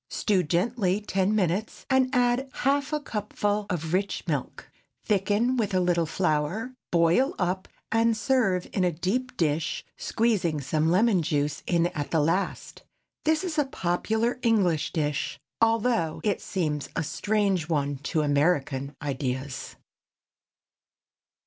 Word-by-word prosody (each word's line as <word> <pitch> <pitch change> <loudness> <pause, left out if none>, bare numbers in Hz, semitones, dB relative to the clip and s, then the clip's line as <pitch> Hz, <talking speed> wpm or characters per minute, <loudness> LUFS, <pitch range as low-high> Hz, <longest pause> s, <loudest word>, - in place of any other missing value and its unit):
Stew 200 -4 +1
gently 185 +4 +1
ten 195 0 0
minutes, 195 +2 -1
and 265 -1 +3
add 250 +2 +2 0.2
half 280 +1 +2
a 300 - 0
cupful 210 -4 -2
of 165 -3 -3
rich 195 +2 0
milk; - - -3 0.4
thicken 210 +5 +1
with 210 -4 0
a - - +4
little 175 -2 +2
flour, 175 +9 -1 0.2
boil 170 +11 +3
up, 185 0 -1 0.2
and 225 0 +3
serve 205 -5 +1
in 190 - +1
a 180 - +3
deep 240 +11 -2
dish, 155 -1 0
squeezing 205 -9 0
some 155 +4 0
lemon 190 +1 +4
juice 145 -1 -1
in 170 -1 +2
at 145 -4 -3
the 165 - +2
last. 165 +6 -1 0.4
This 315 +3 +2
is 335 -4 -1
a 295 - +3
popular 220 +3 -1
English 200 -10 +2
dish, 150 -3 -2 0.2
although 225 -7 +2
it 205 -2 0
seems 155 -6 -2
a - - 0
strange 200 -1 0
one 145 -3 0
to 155 +2 -1
American 145 -2 +1
ideas. 130 -1 -3
185 Hz, 135 wpm, -27 LUFS, 160-225 Hz, 0.4 s, a